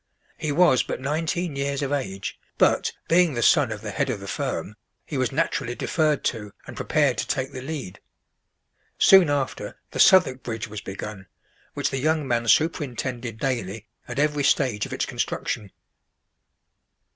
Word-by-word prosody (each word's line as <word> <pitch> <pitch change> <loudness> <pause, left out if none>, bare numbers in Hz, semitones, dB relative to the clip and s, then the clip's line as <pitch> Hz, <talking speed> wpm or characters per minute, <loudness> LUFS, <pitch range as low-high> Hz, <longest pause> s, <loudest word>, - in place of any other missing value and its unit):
He 155 - -3
was 145 -4 +5
but - - -4
nineteen 160 +4 -2
years 140 +1 -1
of 140 - -2
age; 95 -9 -3 0.2
but, - - +3 0.2
being 170 -3 +4
the 120 - 0
son 145 -8 +4
of 105 -1 -5
the 105 -2 -5
head 100 - -1
of 115 -5 -2
the 100 - -9
firm, - - -3 0.3
he - - -6
was - - 0
naturally 120 +1 -1
deferred 155 -1 0
to 105 -4 -3
and - - -9
prepared 140 -7 +1
to - - -2
take 135 -1 -1
the 130 -2 -7
lead. 135 -9 -6 1.0
Soon 190 -5 +7
after, 140 -2 -2
the - - -6
Southwark 150 -9 +6
Bridge 115 -2 -4
was 105 -1 -7
begun, 95 0 -7 0.5
which - - -1
the 135 - -2
young 155 0 +1
man 120 -1 0
superintended 125 -5 0
daily 110 -4 -3 0.2
at 120 - -6
every 150 0 +1
stage 125 -6 +2
of - - -13
its - - -1
construction. 100 -3 -3
130 Hz, 165 wpm, -24 LUFS, 115-150 Hz, 1.0 s, Soon